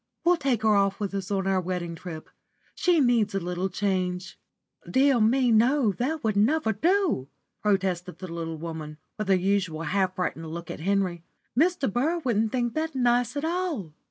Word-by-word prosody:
We'll 350 +1 +4
take 260 -7 0
her 215 -1 +4
off 195 -1 +2
with 200 -2 -3
us 195 -2 -3
on 195 -2 -1
our 190 -1 +2
wedding 175 -1 -3
trip. 165 -1 -8 0.5
She 355 -4 +2
needs 240 -7 +2
a - - +2
little 180 +1 -2
change." 185 -1 -2 0.5
"Dear 265 -1 +4
me, 245 +3 +3
no, 235 +1 +4
that 270 - -2
will 220 -1 +1
never 220 +4 +2
do," 340 - +1 0.3
protested 190 -3 0
the 185 - -7
little 165 -1 -4
woman, 155 -2 -6 0.2
with 215 - -2
her 195 - +5
usual 185 -4 0
half 185 +3 0
frightened 165 -3 -3
look 170 +1 -6
at - - -7
Henry. 185 -1 0 0.3
"Mr. 315 - +2
Burr 310 +8 +1
wouldn't 225 -8 0
think 240 -2 -1
that 315 -1 -2
nice 245 +1 +2
at 285 - -1
all." 330 - -2
200 Hz, 180 wpm, -26 LUFS, 180-260 Hz, 0.5 s, her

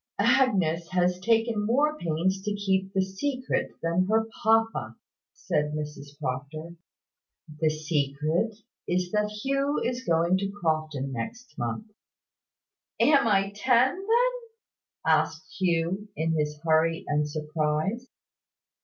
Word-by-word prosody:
"Agnes 175 -10 +2
has 180 0 +1
taken 225 +1 +2
more 285 +8 +2
pains 180 - -1
to 205 +1 -2
keep 190 -1 0
the 190 -1 +2
secret 255 +7 -2
than 170 +3 +1
her 220 +1 +2
papa," 225 +1 +2 0.4
said 150 0 -1
Mrs 150 -1 -7
Proctor. 150 +5 -5 0.8
"The 160 -1 +3
secret 155 +6 -1 0.3
is, 180 0 0
that 210 0 +1
Hugh 275 +7 -1
is 245 +1 -2
going 170 -1 +2
to 195 0 -2
Crofton 155 -5 -1
next 180 - -6
month." 120 - -4 1.1
"Am 275 0 +5
I 195 -2 +2
ten, 250 +4 +4
then?" 475 +5 +2 0.7
asked 160 0 +2
Hugh, 180 +3 0
in 160 +1 0
his 150 -1 -1
hurry 165 0 +2
and 150 0 +1
surprise. 155 - -1
180 Hz, 120 wpm, -27 LUFS, 155-225 Hz, 1.1 s, Am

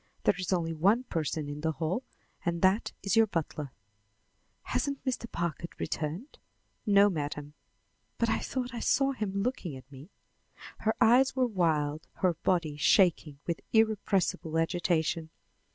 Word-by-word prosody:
There - - +4
is 185 0 -3
only 165 -3 0
one 200 +10 +3
person 155 - -2
in 145 +1 -6
the 160 0 0
hall, 160 - -1 0.4
and 170 0 -1
that 190 +4 +3
is 200 - +1
your 225 -1 +6
butler." 155 -6 -3 0.9
"Hasn't 280 -1 -2
Mr. 245 -3 -2
Packard 170 0 -4
returned?" 165 - -4 0.5
"No, 200 0 +6
Madam." 150 -4 -3 0.6
"But 230 - +1
I 225 - +1
thought 255 -1 -3
I 235 - -4
saw 275 +3 +2
him 215 -7 -3
looking 205 - -3
at 130 +2 -15
me." 140 +5 -12 0.7
Her 220 - 0
eyes 255 +4 +5
were 260 -1 +3
wild, 160 -8 0
her 185 -2 +1
body 165 -2 0
shaking 160 -3 +3
with 170 -1 -2
irrepressible 205 -7 +1
agitation. 165 -1 0
175 Hz, 145 wpm, -30 LUFS, 155-220 Hz, 0.9 s, your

